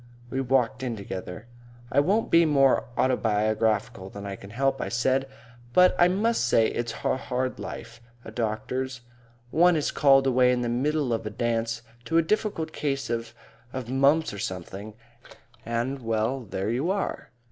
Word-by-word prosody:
We 135 - -1
walked 130 -1 +1
in 125 -3 -2
together. 95 0 -7 0.5
"I - - +4
won't 200 +10 +1
be 170 0 +6
more 135 -6 +3
autobiographical 110 -5 +1
than 100 +1 -8
I 100 -1 -4
can 100 - -12
help," 135 +5 0
I - - -3
said, 130 +3 +1 0.5
"but 180 +4 +6
I 175 - +7
must 210 - +1
say 115 -1 +4
it's 120 -1 -3
hard 130 0 -2
life, 115 0 -8 0.2
a - - -8
doctor's. 120 +3 -3 0.5
One 175 +2 +5
is 150 - 0
called 135 -2 +5
away 125 -1 +4
in 125 -1 0
the 120 - -1
middle 135 +1 0
of 115 -1 -2
a - - -2
dance 115 +1 -2 0.2
to 165 - +1
a 165 - +5
difficult 180 -3 -1
case 135 -4 -2
of 115 0 -3 0.4
of 130 -2 -5
mumps 140 +3 +3
or 100 - -7
something, 95 +3 -6 0.7
and 120 +4 -1
well, 115 +3 -1
there 95 +3 -2
you 135 +9 -1
are. 195 +1 -2
125 Hz, 165 wpm, -26 LUFS, 115-140 Hz, 0.7 s, I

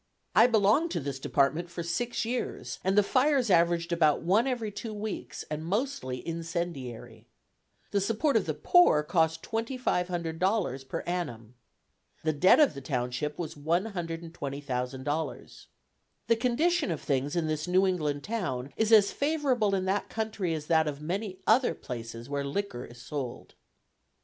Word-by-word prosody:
I - - +8
belonged 225 +8 +3
to - - 0
this 140 -2 -4
department 150 +6 +1
for 170 0 -5
six 230 +8 -2
years, 245 +2 -3
and 190 +2 +1
the 205 - +7
fires 260 0 +2
averaged 170 0 +3
about 160 -3 +3
one 205 +9 +3
every 235 -5 -2
two 215 +1 -6
weeks, 210 0 -5
and 150 +1 -4
mostly 180 - -2
incendiary. 165 -7 -5 0.6
The 200 - +2
support 225 +7 +1
of 200 -5 +2
the 155 - -1
poor 155 - +5
cost 160 0 +1
$2,500.00 180 - -1
per - - -3
annum. 120 -11 -4 0.7
The 155 0 +1
debt 180 - +5
of 300 - +5
the 140 - -8
township 125 +2 -2
was 160 -2 -4
$120,000.00. 150 - -3 0.6
The 230 - +3
condition 295 - +1
of 165 -4 -2
things 140 +1 -1
in 170 -2 +1
this 155 +1 -2
New 185 +2 +4
England 150 -6 -1
town 170 - -3
is 220 0 +1
as 210 -3 +7
favorable 275 -9 +1
in 185 -1 -1
that 195 +2 -1
country 215 -6 -2
as 155 -1 -5
that 160 -1 +3
of 145 0 -4
many 185 +3 -3
other 245 +4 +4
places 115 -1 -7
where 140 0 -2
liquor 140 -3 -3
is 120 0 -14
sold. 125 0 -6
170 Hz, 150 wpm, -29 LUFS, 145-215 Hz, 0.7 s, I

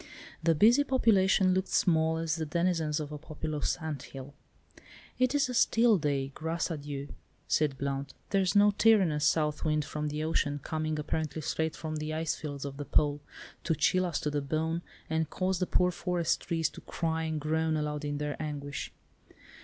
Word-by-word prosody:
The 165 0 +3
busy 235 - +6
population 200 -8 +3
looked 190 +1 0
small 160 -2 +2
as 165 -1 -1
the 160 - -2
denizens 165 -2 0
of 150 -1 -5
a 150 - -6
populous 155 -1 -3
anthill. 140 -3 -7 0.9
"It 255 +2 +2
is 285 - +3
a 250 - -4
still 230 -3 +4
day, 140 -3 -1
'Grâce 165 +2 -2
à 145 - -8
Dieu,'" 140 -1 -6 0.4
said 150 -3 +1
Blount; 140 0 -3 0.2
"there's 195 -1 +2
no 205 0 +6
tyrannous 195 -9 +4
south 150 -1 +1
wind 150 -2 +1
from 150 +1 -3
the 150 +1 -3
ocean—coming 155 0 -1
apparently 155 0 -3
straight 160 +1 -1
from 155 -1 -4
the 155 +1 -3
ice 160 -1 0
fields 145 -2 -6
of 140 -1 -6
the 145 - -5
Pole, 145 0 +2 0.4
to 165 - +1
chill 185 +5 +2
us 170 - -2
to 150 -3 -1
the 145 0 -1
bone, 160 +4 -1 0.3
and 160 -1 -1
cause 185 +2 -1
the 185 - 0
poor 180 0 +3
forest 175 -1 0
trees 165 -3 0
to - - -11
cry 160 -1 -2
and 160 -1 -2
groan 160 +1 0
aloud 150 0 -2
in 145 0 -2
their 150 0 -2
anguish. 145 -2 -5
155 Hz, 180 wpm, -30 LUFS, 150-175 Hz, 0.9 s, busy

